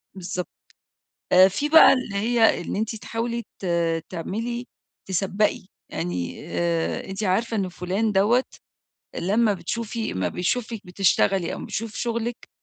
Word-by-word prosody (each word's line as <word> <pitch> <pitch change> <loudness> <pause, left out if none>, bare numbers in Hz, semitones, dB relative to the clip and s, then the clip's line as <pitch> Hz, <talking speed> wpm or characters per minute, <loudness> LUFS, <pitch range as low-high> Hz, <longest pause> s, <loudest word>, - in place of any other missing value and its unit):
بالضبط. 180 -1 -4 0.8
آآ 185 +1 +8
في 200 +11 -2
بقى 320 +1 +9
اللي 255 -6 -3
هي 225 +1 +3
إن - - -4
أنتِ 220 +2 -2
تحاولي 230 +2 -3 0.2
ت - - -5 0.4
تعملي 235 +8 -4 0.4
تسبّقي. 195 +2 0 0.2
يعني 90 - -4
آآ 170 -1 -1
أنتِ 195 +2 -4
عارفة 220 +4 +1
إن 190 -2 -1
فُلان 190 +5 -1
دوّة 215 +6 +3 0.7
لمّا 210 +4 +2
بتشوفي 225 +5 -3
أمّا 95 -1 -1
بيشوفِك 220 - -2
بتشتغلي 185 0 +2
أو - - -5
أمّا - - -6
بيشوف 220 0 -4
شُغلِك 235 0 -3
205 Hz, 135 wpm, -24 LUFS, 180-230 Hz, 0.8 s, بقى